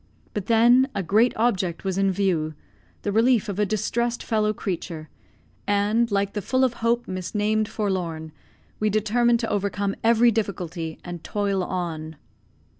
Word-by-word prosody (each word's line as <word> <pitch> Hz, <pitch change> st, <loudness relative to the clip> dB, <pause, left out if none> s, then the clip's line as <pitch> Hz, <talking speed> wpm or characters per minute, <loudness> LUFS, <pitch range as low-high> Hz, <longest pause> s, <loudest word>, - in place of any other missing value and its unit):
But, 205 Hz, -3 st, -4 dB
then, 240 Hz, +4 st, +5 dB
a 200 Hz, -, -1 dB
great 215 Hz, +8 st, +3 dB
object 190 Hz, -7 st, 0 dB
was 190 Hz, -2 st, -1 dB
in 195 Hz, 0 st, +2 dB
view, 175 Hz, -5 st, 0 dB, 0.5 s
the 205 Hz, -, -1 dB
relief 230 Hz, +1 st, +3 dB
of 200 Hz, -1 st, -4 dB
a 210 Hz, -, +2 dB
distressed 235 Hz, +3 st, -1 dB
fellow 215 Hz, -1 st, +1 dB
creature, 170 Hz, -6 st, -5 dB, 0.6 s
and 210 Hz, +3 st, +2 dB
like 200 Hz, -1 st, 0 dB
the 210 Hz, -, -2 dB
"full 260 Hz, +6 st, +1 dB
of 255 Hz, -2 st, +2 dB
hope, 235 Hz, +1 st, +1 dB
misnamed 210 Hz, +3 st, -1 dB
forlorn," 175 Hz, -7 st, -3 dB, 0.5 s
we 215 Hz, -, +2 dB
determined 230 Hz, +3 st, +2 dB
to 225 Hz, -, -2 dB
overcome 200 Hz, 0 st, -1 dB
every 235 Hz, +1 st, +5 dB
difficulty, 175 Hz, -7 st, -3 dB
and 175 Hz, -2 st, -7 dB
toil 200 Hz, -2 st, -1 dB
on. 165 Hz, -4 st, -4 dB
205 Hz, 150 wpm, -24 LUFS, 185-225 Hz, 0.6 s, then